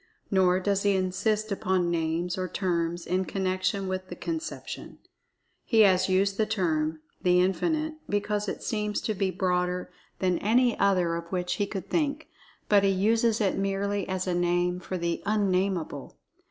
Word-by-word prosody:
Nor 185 -2 +4
does 200 +1 0
he 200 -1 +2
insist 210 +3 0
upon 185 -3 0
names, 170 +1 -1
or 185 0 -2
terms, 175 -3 -1
in 185 +1 0
connection 185 +2 -1
with 185 0 -3
the 175 - -7
conception. 325 - -5 0.7
He 225 -2 +4
has 190 -2 +4
used 195 +1 +2
the 220 - +1
term, 160 -7 0 0.2
"The 180 0 +4
Infinite," 310 - 0
because 205 0 -1
it - - -5
seems 210 -2 -1
to 215 - -1
be 195 -1 0
broader 180 -1 -1 0.3
than 180 -2 +1
any 240 +3 +3
other 180 -4 +2
of 170 0 -8
which 180 -1 -1
he 205 - 0
could 195 -2 -5
think, 300 -1 -1 0.4
but 205 -1 +5
he 195 - +4
uses 220 +4 +2
it 195 -2 +1
merely 195 0 -1
as 185 0 -1
a 180 - 0
name 175 0 +1
for 185 +1 -4
the 170 -1 -2
Un 210 -2 +2
Nameable. 180 -7 -2
190 Hz, 165 wpm, -27 LUFS, 180-205 Hz, 0.7 s, but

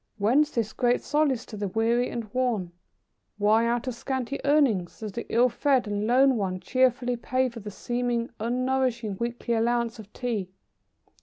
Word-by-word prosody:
Whence 255 +9 +3
this 225 -6 -2
great 245 -1 +1
solace 290 -5 +1
to 220 - -9
the 205 -1 -2
weary 230 +5 +1
and 235 - -4
worn? 235 -9 0 0.7
Why 215 +3 +3
out 240 +1 0
of 255 - -1
scanty 260 +2 -3
earnings 265 - +2
does 215 -2 -4
the 235 - -6
ill 240 +2 +5
fed 255 +1 +1
and 205 0 -2
lone 260 +1 +4
one 185 -3 -2
cheerfully 250 +4 +1
pay 255 +2 0
for 235 -1 -9
the 210 -1 -7
seemingly 240 +2 -2
unnourishing 245 -3 -1
weekly 235 0 -2
allowance 235 0 0
of 210 -1 -11
Tea? 225 -7 -3
235 Hz, 165 wpm, -26 LUFS, 220-255 Hz, 0.7 s, ill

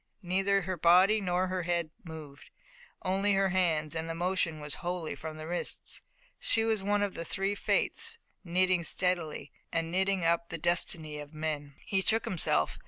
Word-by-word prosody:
Neither 195 +2 +2
her 185 0 -3
body 185 +6 +5
nor 180 -1 +1
her 185 0 -2
head 170 -2 -1
moved, 155 -4 -10 0.5
only 195 +2 +2
her 195 0 +3
hands, 165 -5 +1
and 165 0 -3
the 165 - -3
motion 175 -2 0
was 150 -1 -3
wholly 175 -2 -2
from 155 -1 -7
the 155 - -7
wrists. 175 +2 -2 0.4
She 225 - +1
was 220 -2 +1
one 205 +1 +1
of 200 -2 -1
the 165 - -4
three 195 +3 -1
Fates, 205 - +1 0.3
knitting 185 0 +2
steadily 170 -5 -1 0.2
and 165 0 -1
knitting 190 -1 +1
up 170 0 +2
the 165 - -3
destiny 160 -2 0
of 150 +1 -9
men. 150 -2 -3
He 195 -1 +1
shook 220 +3 +3
himself. 155 - +1
175 Hz, 170 wpm, -31 LUFS, 160-190 Hz, 0.5 s, body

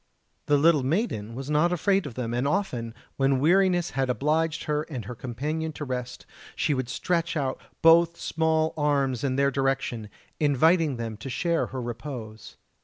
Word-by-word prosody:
The 145 - +4
little 155 0 +4
maiden 130 - -1
was 135 +1 -6
not 155 +4 +3
afraid 190 0 +1
of 125 - -9
them, 120 -2 -3
and 125 +3 0
often, 125 - -2 0.2
when 135 -1 +2
weariness 175 +3 +3
had 135 -1 -1
obliged 155 +5 0
her 150 0 0
and 125 -8 -5
her 125 - -6
companion 150 +7 -4
to 150 - -6
rest, 125 -1 -5 0.3
she 150 - +1
would 130 -2 -2
stretch 170 +2 -1
out 135 -3 -2 0.2
both 170 +1 +5
small 160 0 +1
arms 140 -5 0
in 130 -2 0
their 140 0 +2
direction, 135 -5 -1 0.3
inviting 155 0 +3
them 115 -2 -5
to 115 +6 -7
share 170 +6 0
her 130 - -6
repose. 115 -3 -7
140 Hz, 170 wpm, -26 LUFS, 125-160 Hz, 0.3 s, both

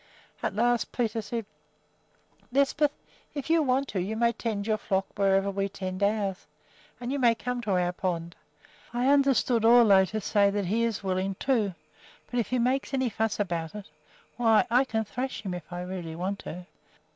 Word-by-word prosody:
At - - -2
last 240 +1 +1
Peter 230 -2 -1
said: 230 +1 -4 1.1
"Lisbeth, 280 +2 +3 0.5
if 285 +2 -3
you 330 -1 +5
want 270 -1 +1
to, 190 - -1
you 205 +5 -3
may 235 0 +3
tend 220 -3 -3
your 215 -1 0
flock 195 -2 0
wherever 195 0 +2
we 195 0 -1
tend 185 -1 -5
ours, 200 -2 0 0.5
and 245 +1 -4
you 280 - -1
may 235 -3 +4
come 250 +1 -3
to 215 - -3
our 180 -1 +2
pond. 170 -2 -3 0.6
I 245 +2 +2
understood 270 -4 +3
Ole 225 -5 +6
to 215 - -3
say 205 -1 +3
that 200 -1 -1
he 220 +6 +1
is 225 -3 -2
willing, 190 0 -1
too; 215 -6 0 0.6
but 245 - 0
if 225 - 0
he 255 - 0
makes 260 +3 0
any 260 -2 +1
fuss 220 0 -1
about 170 -3 -2
it, 205 -6 -8 0.5
why 225 -3 +4
I 250 +3 +4
can 220 -3 -1
thrash 255 +4 -4
him 190 -3 -3
if 175 -1 -8
I 175 0 -4
really 180 -3 -6
want 190 +4 -3
to." 180 +2 -8
215 Hz, 185 wpm, -28 LUFS, 190-245 Hz, 1.1 s, Ole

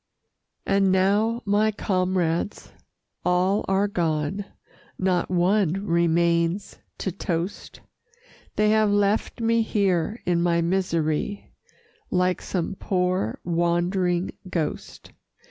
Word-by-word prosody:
And 195 -1 +3
now 205 +5 +2
my 210 +2 +2
comrades 185 -3 -1 0.5
all 180 +3 +2
are 195 +1 +2
gone, 170 +1 -1 0.5
Not 185 -2 0
one 185 +1 +1
remains 170 +1 +1 0.2
to 190 - -3
toast; 175 +1 -4 0.7
They 210 0 +3
have 215 -1 +3
left 205 +3 +1
me 230 0 +3
here 200 -1 0
in 175 -1 +1
my 170 -1 +2
misery, 170 +1 -1 0.6
Like 180 0 +1
some 180 0 -2
poor 180 - 0
wandering 175 +1 0 0.2
ghost. 165 -4 -4
185 Hz, 95 wpm, -24 LUFS, 170-200 Hz, 0.7 s, And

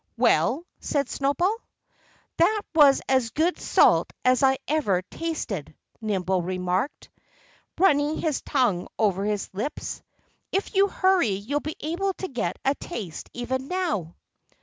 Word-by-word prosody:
"Well?" 330 +5 +2
said 285 -3 -1
Snowball. 315 +10 +1 0.8
"That 410 +5 +3
was 290 -4 +6
as 260 -3 +2
good 325 +9 0
salt - - +4
as 255 -1 +4
I 265 -1 +4
ever 205 -13 +1
tasted," 200 - -4 0.3
Nimble 190 -4 0
remarked, 185 - -2 0.7
running 300 -4 +3
his 310 -4 -1
tongue 240 - +1
over 200 -2 +1
his 210 -1 -2
lips. 215 +10 -4 0.5
"If 390 +3 -1
you 395 0 +4
hurry 375 - +2
you'll 205 +9 -1
be 310 +1 -5
able 365 +5 -1
to 375 - -5
get 240 - -3
a 270 - +4
taste 215 - -7
even 260 +2 -3
now." 320 - -2
270 Hz, 130 wpm, -25 LUFS, 200-330 Hz, 0.8 s, was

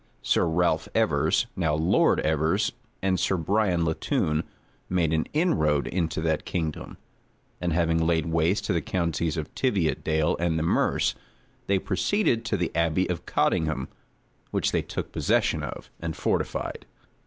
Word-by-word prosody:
Sir - - +2
Ralph 80 -1 +1
Evers, 80 -3 +2
now 80 -5 +1
Lord 80 +3 +3
Evers 80 +6 +1 0.3
and 95 -1 +2
Sir 95 - +1
Bryan 90 0 +1
Latoun, 80 -1 0 0.5
made 85 -3 +1
an 80 - 0
inroad 80 - +2
into 85 -3 -1
that 80 -2 0
kingdom; 80 -4 -4 0.6
and 90 -1 0
having 80 0 +2
laid 80 -1 +1
waste 85 +4 +1
the 85 -5 +1
counties 85 -1 -1
of 80 -1 -5
Tiviotdale 80 - +1
and 85 -1 +1
the 80 - 0
Merse, 80 - +2 0.5
they 100 - +3
proceeded 115 - +1
to 110 -2 0
the 90 -2 -1
abbey 85 +2 +2
of 85 - -5
Coldingham, 80 -5 0 0.6
which - - 0
they - - +1
took - - -5
possession - - +1
of, - - -7
and 80 -1 -4
fortified. - - -2
85 Hz, 145 wpm, -26 LUFS, 80-90 Hz, 0.6 s, Lord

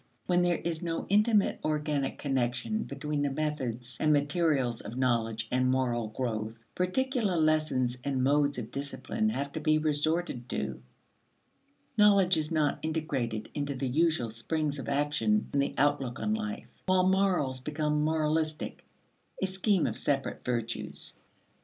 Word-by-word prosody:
When 180 -1 +3
there 175 -1 +2
is 165 -1 -3
no 165 -2 -2
intimate 210 +1 +3
organic 150 -2 -1
connection 135 - -1
between 145 +1 -3
the 145 - +1
methods 135 -5 -3
and 155 - +3
materials 145 -5 +1
of 115 +4 -7
knowledge 115 -3 0
and 130 0 +2
moral 125 -3 +1
growth, 110 0 -4
particular 215 +1 0
lessons 155 -6 +2
and 135 -2 0
modes 145 +1 +3
of 120 -1 -5
discipline 140 - -2
have 140 -9 -2
to 160 - -4
be 155 0 +3
resorted 155 -3 0
to: - - -3 1.2
knowledge 200 -3 +6
is 155 -1 -1
not 155 -3 +1
integrated 140 -9 -2
into 145 -1 -2
the 130 +1 -2
usual 155 -4 +2
springs 145 +5 -2
of 115 -4 -5
action 150 +10 +1
and 140 - +3
the 140 - -1
outlook 135 -3 +1
on 215 - 0
life, 215 0 -4
while 185 0 +4
morals 185 -9 +2
become 150 +2 -1
moralistic 155 0 0 0.6
a - - +1
scheme 190 0 +1
of - - -2
separate 135 -2 -1
virtues. 120 -2 -3
150 Hz, 145 wpm, -30 LUFS, 130-165 Hz, 1.2 s, knowledge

